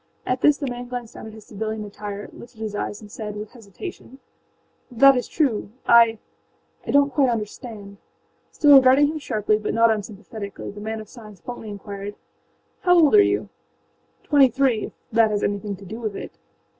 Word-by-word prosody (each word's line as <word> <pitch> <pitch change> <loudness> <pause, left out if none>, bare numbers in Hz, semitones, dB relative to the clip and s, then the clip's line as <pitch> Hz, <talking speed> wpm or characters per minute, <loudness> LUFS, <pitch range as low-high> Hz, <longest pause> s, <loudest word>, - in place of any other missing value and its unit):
â - - -2
At 255 0 -1
this 295 -1 +5
the 290 - -4
man 245 -1 -5
glanced 245 -2 -6
down - - -9
at 220 - -10
his 220 -1 -13
civilian 215 +1 -4
attire, 205 0 -7
lifted 235 -1 -14
his 215 -2 -4
eyes, 205 0 -4
and 210 -1 -13
said 210 -1 -6
with 210 0 -7
hesitation: 245 - -10 0.7
âThat 275 +3 +6
is 250 - -2
true. 260 -11 0 0.2
IâI 230 -1 +6 0.7
donât 285 0 +3
quite 270 -1 +2
understand.â 210 -2 -6 0.5
Still 290 -2 +7
regarding 265 +2 +5
him 310 0 -4
sharply 215 -5 0
but 210 - -3
not 230 0 +5
unsympathetically 210 -1 -6
the 205 +1 -10
man 220 +1 -4
of 215 - -12
science 215 -5 -13
bluntly 240 -1 -8
inquired: 200 0 -7 0.7
âHow 355 -1 +5
old 310 -3 +5
are 420 - +8
you?â - - -5
âTwenty 275 -4 +5
threeâif 260 -5 +1 0.2
that 225 -1 +4
has 210 -1 -1
anything 205 0 -2
to 195 +1 -13
do 220 +5 -7
with 215 -4 -4
it. - - -9
220 Hz, 180 wpm, -23 LUFS, 210-255 Hz, 0.7 s, are